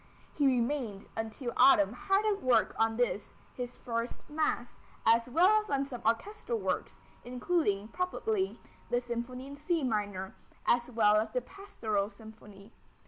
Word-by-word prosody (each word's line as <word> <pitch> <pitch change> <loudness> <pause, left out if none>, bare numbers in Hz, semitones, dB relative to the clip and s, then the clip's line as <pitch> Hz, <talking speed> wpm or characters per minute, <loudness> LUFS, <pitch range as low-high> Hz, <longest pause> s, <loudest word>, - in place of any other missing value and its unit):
He 285 -2 +2
remained 240 -5 0
until 225 +3 -4
autumn 220 -6 +6
hard 390 - +1
at 415 -2 +1
work 255 -1 +3
on 225 0 +2
this, 240 -4 -1 0.2
his 245 -1 -6
first 230 0 -4
mass, 300 -5 -1 0.3
as 230 +2 +4
well 370 - +5
as 425 - -12
on 275 0 +1
some 250 -4 -7
orchestral 410 - -1
works, - - -3 0.2
including, 245 - 0
probably 380 - -1 0.3
the 245 - +2
Symphony 245 +1 -5
in 280 +1 -8
C 325 +2 -1
minor, 205 -5 -2 0.3
as 240 0 +2
well 215 -3 +4
as 220 +1 +1
the 250 +3 -1
Pastoral 220 - -3
Symphony. 210 -1 -14
245 Hz, 145 wpm, -31 LUFS, 220-295 Hz, 0.3 s, autumn